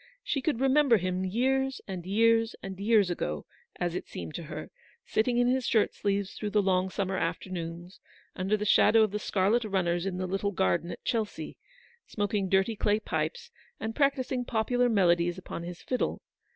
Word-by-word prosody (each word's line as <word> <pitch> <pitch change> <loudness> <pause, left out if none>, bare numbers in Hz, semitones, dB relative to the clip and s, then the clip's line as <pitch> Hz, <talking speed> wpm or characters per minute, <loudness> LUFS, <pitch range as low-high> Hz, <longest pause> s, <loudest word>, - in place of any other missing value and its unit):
She 280 - -1
could 285 -4 0
remember 270 -2 +4
him 185 0 -2
years, 265 +7 0
and 185 -3 -6
years, 225 +2 +3
and 190 -1 -6
years 205 -3 +3
ago, 75 - -3 0.3
as 175 -1 -2
it - - -4
seemed 80 -3 -7
to - - -5
her, - - -7 0.3
sitting 240 +2 +1
in 245 0 +3
his 255 0 +1
shirt 220 -2 +2
sleeves 200 -1 -1
through 210 - -4
the 210 - +2
long 185 -1 +2
WAITING. 190 0 -2
101 190 - -1
summer - - +1
afternoons, 170 0 -7 0.4
under 195 +3 0
the 210 - -3
shadow 220 +1 +5
of 215 - +1
the 210 - -2
scarlet 210 +4 +1
runners 185 -3 0
in 185 -2 -3
the 185 - -2
little 195 +2 -1
garden 175 -2 +1
at - - -8
Chelsea, 220 -3 -2 0.5
smoking 205 -2 -1
dirty 195 +4 +2
clay 210 +1 +1
pipes 475 - -3 0.3
and 225 0 -4
practising 270 -3 +1
popular 245 +1 +1
melodies 175 -4 +3
upon 185 - -7
his 175 +1 -8
fiddle. 255 - -2
205 Hz, 185 wpm, -29 LUFS, 185-230 Hz, 0.5 s, shadow